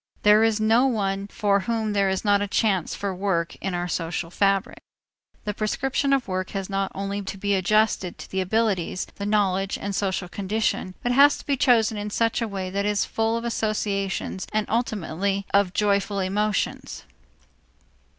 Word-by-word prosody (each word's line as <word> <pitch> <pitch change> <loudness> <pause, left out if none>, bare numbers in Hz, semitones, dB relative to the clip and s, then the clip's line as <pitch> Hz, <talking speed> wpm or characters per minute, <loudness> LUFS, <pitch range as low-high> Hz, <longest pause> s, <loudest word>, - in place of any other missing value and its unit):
There 210 +1 +6
is 225 -1 +2
no 225 +4 +4
one 200 -5 -1
for 205 -1 +1
whom 220 0 -1
there 200 -1 +2
is 190 +3 -2
not 205 -1 +4
a 205 - -1
chance 195 -4 0
for 200 -1 -3
work 180 -3 -1
in 190 -2 -3
our 175 0 -2
social 165 0 -3
fabric. 195 0 +1 0.7
The 210 - -1
prescription 270 +7 -1
of 270 -5 +2
work 185 0 -2
has 195 0 -5
not 195 0 -1
only 200 +1 -3
to 195 0 -6
be 200 +1 0
adjusted 195 -1 +1
to - - -9
the 190 - 0
abilities, 190 -3 0
the 200 - -3
knowledge, 195 -2 +1
and 200 - -4
social 190 -2 -1
condition, 195 0 -2
but 245 - +1
has 285 +3 +6
to - - -12
be 280 - +1
chosen 225 -5 +3
in 205 0 -4
such 230 +3 0
a 230 - 0
way 190 -3 -4
that 200 +1 -1
it 205 - +1
is 205 -1 +1
full 225 +1 0
of 230 - -5
associations 205 -4 -2
and 215 0 0
ultimately 200 -4 -1
of 200 -2 +4
joyful 200 0 +1
emotions. 200 +2 -1
200 Hz, 180 wpm, -24 LUFS, 190-220 Hz, 0.7 s, There